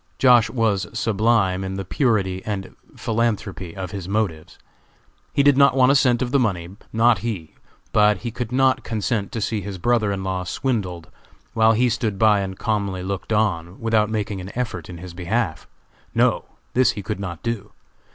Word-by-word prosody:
Josh. 125 Hz, -4 st, +5 dB
was 105 Hz, -7 st, 0 dB
sublime 105 Hz, -4 st, +2 dB
in 95 Hz, 0 st, -4 dB
the 95 Hz, 0 st, -4 dB
purity 95 Hz, -6 st, 0 dB
and 100 Hz, -3 st, -5 dB, 0.2 s
philanthropy 105 Hz, -6 st, -2 dB
of 95 Hz, -2 st, -5 dB
his 95 Hz, -2 st, -6 dB
motives. 100 Hz, -7 st, -2 dB, 0.7 s
He 140 Hz, -, +2 dB
did 145 Hz, -1 st, +5 dB
not 140 Hz, -1 st, +5 dB
want 130 Hz, +1 st, +6 dB
a -, -, +4 dB
cent 125 Hz, -3 st, +3 dB
of 125 Hz, -, -3 dB
the 140 Hz, -, +3 dB
money; 95 Hz, -6 st, -1 dB, 0.2 s
not 115 Hz, -1 st, +4 dB
he! 100 Hz, -7 st, -5 dB, 0.4 s
but 105 Hz, -1 st, +4 dB
he 120 Hz, -, -2 dB
could 120 Hz, 0 st, -5 dB
not 130 Hz, 0 st, +2 dB
consent 105 Hz, -2 st, -2 dB
to 115 Hz, -, -3 dB
see 110 Hz, 0 st, -1 dB
his 100 Hz, -2 st, -6 dB
brother 110 Hz, +1 st, +1 dB
in 95 Hz, -1 st, -3 dB
law 95 Hz, -1 st, -2 dB
swindled 90 Hz, -6 st, -3 dB, 0.4 s
while 110 Hz, 0 st, +4 dB
he 125 Hz, +3 st, +3 dB
stood 110 Hz, -3 st, -1 dB
by 105 Hz, -1 st, +4 dB
and 95 Hz, -1 st, -4 dB
calmly 100 Hz, -4 st, -1 dB
looked 95 Hz, +3 st, -4 dB
on, 95 Hz, -5 st, 0 dB
without 110 Hz, -2 st, +2 dB
making 105 Hz, -3 st, -2 dB
an 90 Hz, -, -7 dB
effort 125 Hz, -6 st, -3 dB
in 90 Hz, -, -7 dB
his 90 Hz, 0 st, -9 dB
behalf. 90 Hz, 0 st, -2 dB, 0.5 s
No! -, -, +2 dB, 0.3 s
this 125 Hz, -1 st, +4 dB
he 100 Hz, -, -6 dB
could 105 Hz, 0 st, -4 dB
not 85 Hz, -4 st, -6 dB
do. 115 Hz, -3 st, -3 dB
105 Hz, 180 wpm, -22 LUFS, 95-115 Hz, 0.7 s, want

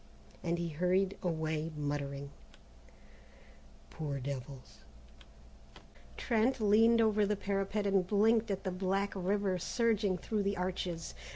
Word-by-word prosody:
and 170 Hz, 0 st, -1 dB
he 170 Hz, 0 st, -2 dB
hurried 185 Hz, +5 st, +1 dB
away 160 Hz, -2 st, -2 dB
muttering, 140 Hz, -1 st, -3 dB, 1.6 s
"Poor 145 Hz, -3 st, -4 dB
devils!" 130 Hz, 0 st, -7 dB, 1.4 s
Trent 235 Hz, +3 st, +1 dB
leaned 225 Hz, +2 st, +5 dB
over 215 Hz, -2 st, +3 dB
the 210 Hz, +1 st, +1 dB
parapet 200 Hz, +1 st, -1 dB
and 195 Hz, -2 st, +2 dB
blinked 220 Hz, +3 st, +3 dB
at 195 Hz, -1 st, -2 dB
the 190 Hz, -, -2 dB
black 195 Hz, +2 st, -1 dB
river 190 Hz, 0 st, 0 dB
surging 210 Hz, -1 st, +1 dB
through 210 Hz, +4 st, -2 dB
the 200 Hz, 0 st, -1 dB
arches. 180 Hz, -2 st, -3 dB
190 Hz, 115 wpm, -33 LUFS, 165-205 Hz, 1.6 s, leaned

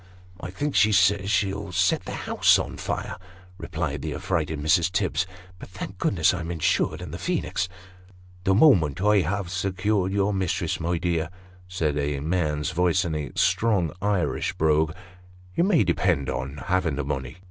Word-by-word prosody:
" 90 Hz, 0 st, -24 dB
I 90 Hz, -, -6 dB
think 145 Hz, +10 st, -3 dB
she 110 Hz, -, +5 dB
says 100 Hz, 0 st, +3 dB
she'll 100 Hz, +1 st, 0 dB
set 90 Hz, +1 st, +1 dB
the -, -, -5 dB
house -, -, +4 dB
on -, -, -4 dB
fire," -, -, -4 dB, 0.4 s
replied -, -, -3 dB
the -, -, -4 dB
affrighted 80 Hz, -4 st, -2 dB
Mrs. 85 Hz, +4 st, +2 dB
Tibbs. 95 Hz, -2 st, 0 dB, 0.2 s
" 90 Hz, 0 st, -22 dB
But -, -, -10 dB
thank 95 Hz, 0 st, -8 dB
God 95 Hz, -, 0 dB
I'm 90 Hz, -2 st, -4 dB
insured 85 Hz, -3 st, 0 dB
in -, -, -7 dB
the -, -, -6 dB
Phoenix! 95 Hz, -, -1 dB, 0.2 s
" 90 Hz, 0 st, -24 dB
" 90 Hz, 0 st, -24 dB
The 95 Hz, -1 st, +3 dB
moment 95 Hz, -, +5 dB
I 105 Hz, +1 st, +4 dB
have 95 Hz, +1 st, -2 dB
secured 95 Hz, +1 st, 0 dB
your 100 Hz, +1 st, +1 dB
mistress, 95 Hz, -4 st, -1 dB
my 85 Hz, +1 st, -1 dB
dear," 85 Hz, -2 st, -1 dB, 0.4 s
said 80 Hz, -5 st, -1 dB
a 70 Hz, -1 st, -1 dB
man's 75 Hz, -2 st, -1 dB
voice 90 Hz, +2 st, +2 dB
in 85 Hz, -, -2 dB
a 75 Hz, -2 st, -3 dB
strong 100 Hz, -8 st, +2 dB
Irish 100 Hz, -3 st, 0 dB
brogue, 80 Hz, 0 st, +2 dB, 0.6 s
"you 170 Hz, -, +2 dB
may 180 Hz, -, +4 dB
depend 85 Hz, -5 st, +1 dB
on 70 Hz, +2 st, -4 dB
having 90 Hz, -5 st, +1 dB
the 75 Hz, -, -2 dB
money." 65 Hz, -1 st, -4 dB
90 Hz, 180 wpm, -25 LUFS, 80-95 Hz, 0.6 s, she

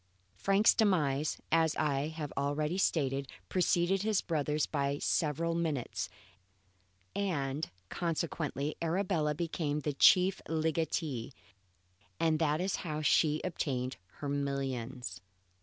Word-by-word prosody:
Frank's 195 Hz, -, +4 dB
demise, 155 Hz, -, +2 dB
as 160 Hz, -1 st, +3 dB
I 145 Hz, -1 st, +1 dB
have 155 Hz, -2 st, -5 dB
already 150 Hz, +5 st, 0 dB
stated, 140 Hz, -6 st, +1 dB, 0.2 s
preceded 180 Hz, +1 st, +2 dB
his 215 Hz, -1 st, +2 dB
brother's 150 Hz, -2 st, 0 dB
by 140 Hz, -1 st, -1 dB
several 160 Hz, +3 st, 0 dB
minutes 160 Hz, -7 st, -2 dB, 1.1 s
and 155 Hz, -7 st, -1 dB, 0.2 s
consequently 155 Hz, -3 st, -2 dB
Arabella 165 Hz, -3 st, +1 dB
became 150 Hz, -2 st, -2 dB
the 150 Hz, 0 st, -1 dB
chief 180 Hz, +7 st, +5 dB
legatee; 160 Hz, -5 st, -1 dB, 0.9 s
and 160 Hz, -2 st, +2 dB
that 155 Hz, -1 st, +2 dB
is 190 Hz, +2 st, 0 dB
how 155 Hz, -3 st, -4 dB
she 155 Hz, 0 st, +3 dB
obtained 130 Hz, -7 st, -2 dB, 0.2 s
her 145 Hz, -, -6 dB
millions. 135 Hz, -3 st, -3 dB
155 Hz, 110 wpm, -32 LUFS, 140-170 Hz, 1.1 s, chief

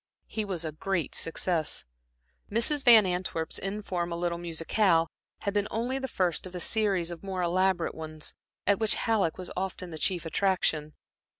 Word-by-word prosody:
He 215 Hz, -1 st, -3 dB
was 180 Hz, -4 st, -2 dB
a 155 Hz, -, -2 dB
great 175 Hz, +2 st, -2 dB
success. 165 Hz, -, 0 dB, 0.7 s
Mrs. 270 Hz, +7 st, +2 dB
Van 225 Hz, -4 st, +9 dB
Antwerp's 180 Hz, -3 st, -1 dB
informal 185 Hz, -4 st, -2 dB
little 170 Hz, 0 st, -1 dB
musicale 165 Hz, +1 st, +2 dB, 0.3 s
had 200 Hz, -, -1 dB
been 205 Hz, 0 st, +1 dB
only 245 Hz, +4 st, -1 dB
the 265 Hz, -, -3 dB
first 185 Hz, -5 st, 0 dB
of 185 Hz, -, -11 dB
a -, -, -3 dB
series 195 Hz, -3 st, +1 dB
of 170 Hz, -, -7 dB
more 190 Hz, -2 st, -3 dB
elaborate 185 Hz, 0 st, +1 dB
ones, 155 Hz, -1 st, -6 dB, 0.3 s
at 200 Hz, -, +3 dB
which 220 Hz, -1 st, +3 dB
Halleck 215 Hz, -8 st, +1 dB
was 185 Hz, -1 st, -6 dB
often 185 Hz, -1 st, -4 dB
the 160 Hz, -, -6 dB
chief 175 Hz, +1 st, 0 dB
attraction. 165 Hz, -4 st, +1 dB
185 Hz, 165 wpm, -29 LUFS, 170-200 Hz, 0.7 s, Van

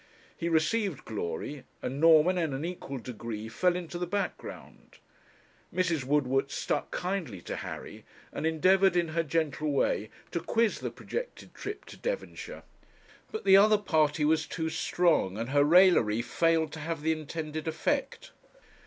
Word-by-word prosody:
He 170 Hz, -, -2 dB
received 170 Hz, -, 0 dB
glory, 110 Hz, -, -4 dB, 0.2 s
and 135 Hz, +3 st, -3 dB
Norman 165 Hz, +2 st, +6 dB
in 165 Hz, -5 st, 0 dB
an 140 Hz, +4 st, -3 dB
equal 170 Hz, -6 st, -5 dB
degree 115 Hz, -2 st, -6 dB
fell 175 Hz, +11 st, +1 dB
into 175 Hz, -1 st, -5 dB
the 180 Hz, -, -2 dB
background. 200 Hz, +3 st, -5 dB, 0.7 s
Mrs. 170 Hz, -6 st, 0 dB
Woodward 135 Hz, -1 st, +1 dB
stuck -, -, -2 dB
kindly 175 Hz, -, -3 dB
to -, -, -5 dB
Harry, -, -, -7 dB, 0.3 s
and 160 Hz, -, -1 dB
endeavoured, 185 Hz, +4 st, +4 dB
in 170 Hz, -2 st, +2 dB
her 165 Hz, +1 st, 0 dB
gentle 155 Hz, -1 st, -1 dB
way, 110 Hz, -6 st, 0 dB, 0.2 s
to 170 Hz, -, -1 dB
quiz 225 Hz, +5 st, +1 dB
the -, -, -3 dB
projected -, -, -6 dB
trip 410 Hz, +1 st, -7 dB
to -, -, -12 dB
Devonshire. -, -, -5 dB, 0.7 s
But 440 Hz, -, -5 dB
the 190 Hz, 0 st, +8 dB
other 210 Hz, +2 st, +6 dB
party 155 Hz, -6 st, +1 dB
was 160 Hz, +1 st, +2 dB
too 160 Hz, -2 st, -3 dB
strong, 160 Hz, -, +1 dB
and 115 Hz, +2 st, -3 dB
her 145 Hz, +1 st, +4 dB
raillery 150 Hz, -, +5 dB
failed 165 Hz, +1 st, +1 dB
to 160 Hz, -, -6 dB
have 160 Hz, 0 st, -4 dB
the 160 Hz, -, +2 dB
intended 155 Hz, 0 st, -4 dB
effect. 275 Hz, -, -2 dB
160 Hz, 155 wpm, -29 LUFS, 145-180 Hz, 0.7 s, the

